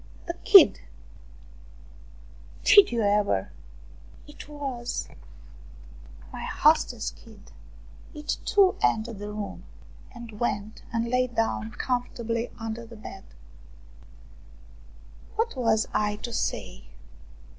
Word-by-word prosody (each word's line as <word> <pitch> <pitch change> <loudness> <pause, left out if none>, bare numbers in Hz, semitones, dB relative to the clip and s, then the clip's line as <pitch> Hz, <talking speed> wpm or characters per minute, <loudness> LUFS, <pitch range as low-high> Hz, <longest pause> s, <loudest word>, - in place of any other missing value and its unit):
The 340 - -3
kid! 400 -8 +8 1.8
Did 405 -5 +7
you 235 -2 0
ever! 200 - +1 0.7
It 295 0 -13
was 270 -5 -4
my - - -18 1.2
48 - - -18
ROUMANIAN - - -5
STORIES - - -8
hostess' - - +3
kid! 60 -1 -17 0.6
It, 300 0 -3
too, 395 -2 +4
entered 220 -1 0
the 205 0 -6
room 210 -1 -6 0.5
and 235 -3 -11
went 215 -2 -3
and 230 0 -1
lay 250 +1 +1
down 225 -2 -2
comfortably 235 -1 -2
under 225 +1 -5
the 230 0 -12
bed. 195 -2 -10 2.1
What 450 -3 -1
was 225 -4 +1
I 210 0 +1
to 235 +3 -7
say - - -3
230 Hz, 110 wpm, -26 LUFS, 210-255 Hz, 2.1 s, kid